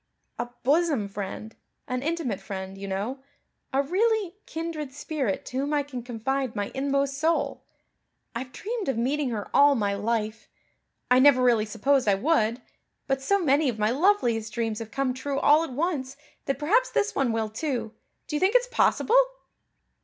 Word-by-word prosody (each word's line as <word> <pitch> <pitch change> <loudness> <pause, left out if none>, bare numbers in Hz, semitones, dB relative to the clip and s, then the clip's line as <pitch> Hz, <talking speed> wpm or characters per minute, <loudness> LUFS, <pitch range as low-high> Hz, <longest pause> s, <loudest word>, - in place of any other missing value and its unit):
"A 240 0 -2
bosom 290 -6 +2
friend 205 +2 -6 0.3
an 255 0 -2
intimate 305 - -2
friend, 190 -1 -6
you 195 0 -7
know 205 +8 -3 0.5
a 275 +1 +2
really 400 +3 +1
kindred 320 -4 -4
spirit 280 -6 -3
to 255 - -5
whom 285 +3 0
I 290 - +2
can 270 -3 -7
confide 250 +2 -2
my 205 -1 -2
inmost 275 0 0
soul. 325 +2 0 0.7
I've 250 +2 -5
dreamed 430 - -4
of 265 - -1
meeting 270 +4 0
her 215 -4 -4
all 285 0 +6
my 205 -4 0
life. 215 +1 -2 0.6
I 250 - +7
never 260 -2 +6
really 235 -4 +4
supposed 255 +4 +1
I 200 - +5
would, 240 -1 +1 0.4
but 270 0 -1
so 400 +9 +2
many 295 -5 +2
of 230 - -3
my 215 +1 +1
loveliest 245 - +2
dreams 225 -1 -2
have 225 -1 -7
come 270 +1 -1
true 275 +2 -3
all 300 +3 +5
at 330 - -5
once 275 -2 -2 0.3
that 275 - -1
perhaps 425 - +2
this 425 - 0
one 265 -4 +1
will, 225 -1 -1
too. 235 -1 -3 0.3
Do 300 - -4
you - - +1
think 385 +7 +2
it's - - +5
possible?" - - +3
265 Hz, 175 wpm, -26 LUFS, 225-300 Hz, 0.7 s, I